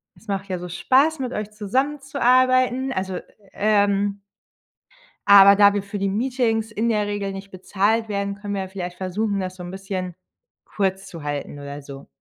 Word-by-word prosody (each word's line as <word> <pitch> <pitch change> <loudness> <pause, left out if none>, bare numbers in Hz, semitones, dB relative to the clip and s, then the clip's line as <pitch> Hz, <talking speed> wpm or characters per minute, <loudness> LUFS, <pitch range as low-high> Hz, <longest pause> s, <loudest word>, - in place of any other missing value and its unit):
es 225 - -22
macht 195 0 -3
ja 185 -1 -3
so 180 - -6
Spaß, 270 - +2
mit 255 -1 -3
euch 210 0 -4
zusammenzuarbeiten. 255 +2 +1
Also, 185 -1 -3 0.3
ähm" 200 -1 +1 1.1
„aber 200 0 +9
da 205 0 +6
wir 205 - 0
für 200 +1 -6
die 195 0 0
Meetings 225 0 0
in 220 +2 -1
der 210 -2 +1
Regel 205 -1 -3
nicht 195 +1 -8
bezahlt 205 +4 0
werden, 200 0 -2
können 205 0 -6
wir 195 - -2
ja 190 - -5
vielleicht 180 -2 -6
versuchen, 200 +2 -2
das 185 0 -4
so 180 - -9
'n 175 - -7
bisschen 190 -2 -5 0.5
kurz 195 -1 -2
zu 165 -5 -9
halten.“, 145 0 -4
oder 140 +1 -7
so. 140 0 -11
200 Hz, 175 wpm, -22 LUFS, 190-225 Hz, 1.1 s, aber